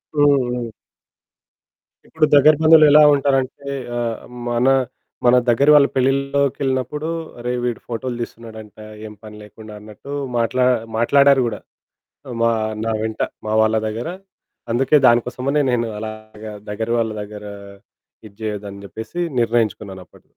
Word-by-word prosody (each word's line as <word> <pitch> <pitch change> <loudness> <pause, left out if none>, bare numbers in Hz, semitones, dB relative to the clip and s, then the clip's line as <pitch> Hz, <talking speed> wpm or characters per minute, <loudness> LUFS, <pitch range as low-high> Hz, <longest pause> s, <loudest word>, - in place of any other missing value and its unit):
హ్మ్. 145 -3 +3
హ్మ్. 120 -2 -4 1.4
ఇప్పుడు 160 -1 +1
దగ్గర 155 +2 +7
బంధువులు 155 -1 +7
ఎలా 150 +1 +7
ఉంటారంటే 140 0 -1 0.3
ఆహ్, 115 -2 -3 0.3
మన 120 +2 +1 0.6
మన 120 +1 +6
దగ్గర 135 +5 +2
వాళ్ళ 145 -1 +6
పెళ్లిల్లోకెళ్ళినప్పుడు, 140 +1 -1 0.3
"అరేయ్ 125 +1 -3
వీడు 120 -2 -3
ఫోటోలు 120 +1 -4
తీస్తున్నాడంట 110 -2 -10 0.3
ఏ - - -7
పని 105 0 -11
లేకుండా" 105 +1 -13
అన్నట్టు 105 +6 -12 0.3
మాట్లా 125 +2 +1 0.3
మాట్లాడారు 140 +3 +4
గూడా. 105 - -5 0.8
మా 115 - +3 0.3
నా 115 - -1
వెంట 110 0 -5 0.3
మా 110 - -2
వాళ్ళ 110 0 +2
దగ్గర. 115 +7 -4 0.6
అందుకే 135 +5 +3
దానికోసమనే 125 +5 +1
నేను 120 -2 0
అలాగా 110 0 -9 0.2
దగ్గర 110 +2 -4
వాళ్ళ 110 -1 0
దగ్గర 105 0 -10 0.8
ఇది 100 - -15
జేయద్దని 100 -2 -6
జెప్పేసి 110 - -7 0.2
నిర్ణయించుకున్నానప్పుడు. 105 -5 -2
120 Hz, 120 wpm, -19 LUFS, 110-140 Hz, 1.4 s, దగ్గర